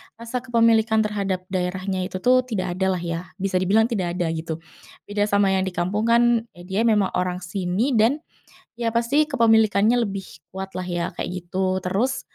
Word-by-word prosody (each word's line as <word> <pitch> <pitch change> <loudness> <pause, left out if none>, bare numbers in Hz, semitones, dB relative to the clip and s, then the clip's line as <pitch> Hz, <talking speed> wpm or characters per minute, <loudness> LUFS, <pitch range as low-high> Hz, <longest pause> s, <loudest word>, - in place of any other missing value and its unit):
rasa 230 +2 -5
kepemilikan 230 -2 +3
terhadap 200 -3 -2
daerahnya 185 0 -2
itu 185 - -6
tuh 255 +1 +5
tidak 185 -7 -3
ada 190 0 +1
lah 175 - -4
ya, 170 -1 -3 0.2
bisa 195 -1 0
dibilang 205 +5 +3
tidak 185 -7 -1
ada 175 -2 -1
gitu. 165 0 -4 0.4
Beda 205 0 -1
sama 200 -1 +3
yang 190 0 +1
di 185 - -4
kampung 195 +5 -1
kan, 235 0 +4
ya 175 - -12
dia 190 +4 -1
memang 210 -4 +3
orang 180 0 -1
sini 185 +5 -1
dan 240 +8 +3 0.6
ya 230 -1 -1
pasti 250 +6 +3
kepemilikannya 220 -1 +3
lebih 200 -4 -2 0.3
kuat 190 0 -5
lah 185 - -3
ya, 175 -1 -2
kayak - - -3
gitu. 185 +1 -1
Terus, 235 +9 0
200 Hz, 180 wpm, -23 LUFS, 185-230 Hz, 0.6 s, tuh